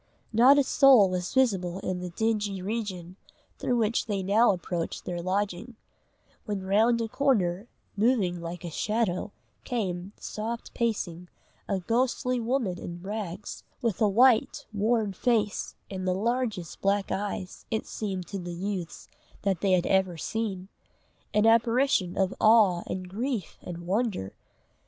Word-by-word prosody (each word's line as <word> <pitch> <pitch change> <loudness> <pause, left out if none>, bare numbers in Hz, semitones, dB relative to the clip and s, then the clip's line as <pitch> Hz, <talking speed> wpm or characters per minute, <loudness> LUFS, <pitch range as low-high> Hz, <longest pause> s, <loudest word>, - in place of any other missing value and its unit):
Not 250 +6 +7
a 285 - +5
soul 260 -8 +6
was 180 -1 -2
visible 195 -9 +1
in 185 -1 -2
the 180 0 -5
dingy 205 0 -1
region 190 -3 -4 0.4
through 245 - 0
which 230 +1 +1
they 200 -3 -1
now 210 +5 +4
approached 175 -2 -4
their 175 -1 -3
lodging, 200 +5 -2 0.7
when 205 -3 -3
round 220 +5 +3
a - - -2
corner, 215 -7 +1 0.3
moving 205 -6 +1
like 170 +2 -6
a 170 - -5
shadow, 210 +1 -1 0.3
came, 190 -5 -3
soft 225 +2 -5
pacing, 180 -7 -2 0.4
a 195 - 0
ghostly 250 +5 0
woman 230 -6 -1
in 175 0 -7
rags, 200 -1 -5 0.2
with 230 -3 -1
a 215 - +5
white, 235 +2 +4
worn 215 0 +1
face, 215 -1 0 0.2
and 185 -1 -4
the 180 - +2
largest 220 -4 -2
black 200 0 +1
eyes, 195 -2 -4
it 220 -1 -2
seemed 190 -4 -4
to 200 - -4
the 175 -1 -6
youths 185 -2 -4 0.4
that 195 -4 0
they 195 -2 +3
had 180 -1 +3
ever 190 -3 +2
seen 195 -1 -3 0.6
an 210 0 +3
apparition 230 -4 +3
of 190 -1 +1
awe 215 -6 +5
and 185 0 -4
grief 220 - -3
and 170 -1 -7
wonder. 195 - -1
200 Hz, 145 wpm, -27 LUFS, 180-230 Hz, 0.7 s, Not